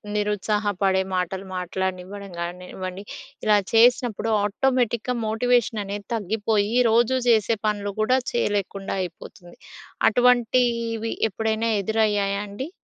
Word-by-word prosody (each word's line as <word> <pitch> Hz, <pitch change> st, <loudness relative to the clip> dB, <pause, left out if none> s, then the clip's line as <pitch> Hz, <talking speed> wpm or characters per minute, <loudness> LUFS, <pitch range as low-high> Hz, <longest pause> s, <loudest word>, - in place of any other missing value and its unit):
నిరుత్సాహపడే 205 Hz, -2 st, 0 dB
మాటలు 185 Hz, +2 st, -2 dB
మాట్లాడనివ్వడం 190 Hz, +1 st, -4 dB
గానివ్వండి 180 Hz, +2 st, -6 dB, 0.4 s
ఇలా 210 Hz, -1 st, +5 dB, 0.2 s
చేసినప్పుడు 235 Hz, -1 st, +3 dB
ఆటోమేటిక్‌గా 245 Hz, +2 st, 0 dB
మోటివేషననేది 220 Hz, -3 st, 0 dB
తగ్గిపోయి 215 Hz, +1 st, 0 dB
రోజూ 235 Hz, +3 st, +3 dB
జేసే 225 Hz, -1 st, +3 dB
పనులు 205 Hz, -1 st, -2 dB
కూడా 255 Hz, +4 st, +3 dB
చేయలేకుండా 200 Hz, -4 st, -1 dB
అయిపోతుంది. 175 Hz, 0 st, -10 dB, 0.5 s
అటువంటివి 235 Hz, -1 st, +2 dB, 0.2 s
ఎప్పుడైనా 220 Hz, +2 st, -1 dB
ఎదురయ్యాయా 205 Hz, -2 st, +1 dB
అండి? 260 Hz, +9 st, -6 dB
210 Hz, 90 wpm, -24 LUFS, 195-230 Hz, 0.5 s, ఇలా